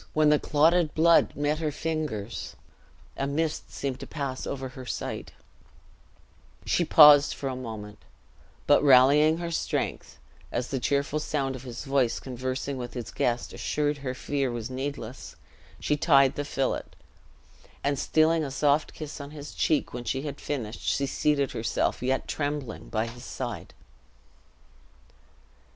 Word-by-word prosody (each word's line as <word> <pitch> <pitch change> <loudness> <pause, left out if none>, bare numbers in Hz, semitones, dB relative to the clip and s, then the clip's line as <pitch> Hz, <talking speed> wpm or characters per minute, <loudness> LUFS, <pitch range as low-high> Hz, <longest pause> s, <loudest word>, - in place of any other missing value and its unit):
when 155 -1 +4
the 150 -1 +4
clotted 160 +2 +3
blood 165 +1 +5
met 145 +1 0
her 155 -2 -1
fingers, 145 -9 -4 0.6
a 135 - -2
mist 155 +2 -2
seemed 135 -2 -4
to - - -8
pass 140 -4 -4
over 135 -1 -4
her 130 0 -10
sight; 125 - -5 1.3
she 175 - +2
paused 150 -3 +8
for 140 - -4
a 130 - -2
moment; 110 -4 -7 0.7
but - - +5
rallying 145 +4 +6
her 170 0 -4
strength, 165 - -2 0.3
as 120 - -2
the 135 - -2
cheerful 140 +4 0
sound 135 -3 -2
of 130 - -8
his 125 +1 -7
voice 135 -4 +1
conversing 130 +2 -4
with 120 0 -6
his 120 -2 -5
guest 120 0 -1
assured 150 -1 -1
her 130 -2 -4
fear 140 0 -1
was 120 +1 -5
needless, 130 -2 -6 0.4
she 150 - +1
tied 140 -4 +4
the 145 - -3
fillet; 135 -2 -1 1.0
and, 140 -1 0
stealing 160 +1 +3
a 140 - -3
soft 145 +2 +1
kiss 155 -1 -7
on 140 - -8
his 150 -1 -9
cheek 155 -3 0
when 120 0 -5
she 130 +3 -2
had 145 -2 -6
finished, 120 -6 -4
she 140 - 0
seated 140 0 +1
herself, 115 0 -1
yet 130 +1 0
trembling, 145 -5 -4
by 110 0 0
his 120 +2 -9
side. 125 -3 -6
140 Hz, 150 wpm, -27 LUFS, 130-150 Hz, 1.3 s, paused